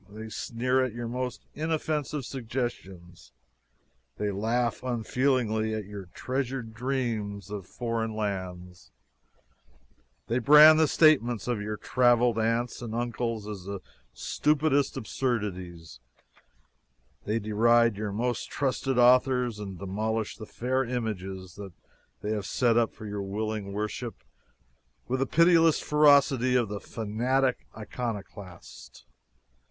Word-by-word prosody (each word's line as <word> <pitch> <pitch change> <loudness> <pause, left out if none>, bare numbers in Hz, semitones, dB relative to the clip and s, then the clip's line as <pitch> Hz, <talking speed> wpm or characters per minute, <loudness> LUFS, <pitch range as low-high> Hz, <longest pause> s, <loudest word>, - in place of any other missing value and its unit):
They 110 +2 -8
sneer 125 +4 0
at 130 -4 -2
your 120 -1 -4
most 125 +1 -4
inoffensive 150 -3 -2
suggestions; 110 -9 -6 0.8
they 105 -1 -1
laugh 115 +4 -1
unfeelingly 120 -2 0
at 110 -2 -4
your 100 -1 -8
treasured 130 -3 -3
dreams 110 -6 -3
of 100 -3 -6
foreign 115 -2 -3
lands; 90 -4 -5 1.4
they 120 +2 0
brand 150 +5 +8
the 160 - +5
statements 125 - +3
of 120 -4 -1
your 105 0 -4
traveled 120 -2 +3
aunts 115 +3 0
and 115 -2 -5
uncles 115 -2 -2
as 100 -4 -7
the 100 0 -5 0.3
stupidest 145 -2 +1
absurdities; 95 - -4 1.3
they 105 +2 0
deride 115 +1 +3
your 105 0 -3
most 120 +4 -2
trusted 135 -1 -1
authors 125 -2 +4
and 100 -3 -6
demolish 105 +4 -2
the 110 - -10
fair 130 +2 -1
images 95 -7 -5 0.6
they 105 - -2
have 105 -2 -2
set 120 -2 +2
up 115 -1 +2
for 110 - -11
your 105 -1 -4
willing 105 +1 -3
worship 105 +3 -4 0.9
with 130 +1 -1
the 135 - 0
pitiless 165 0 +5
ferocity 140 -4 +4
of 120 -4 +2
the 105 0 -4
fanatic 125 +5 -1
iconoclast! 100 - -7
115 Hz, 115 wpm, -28 LUFS, 105-130 Hz, 1.4 s, brand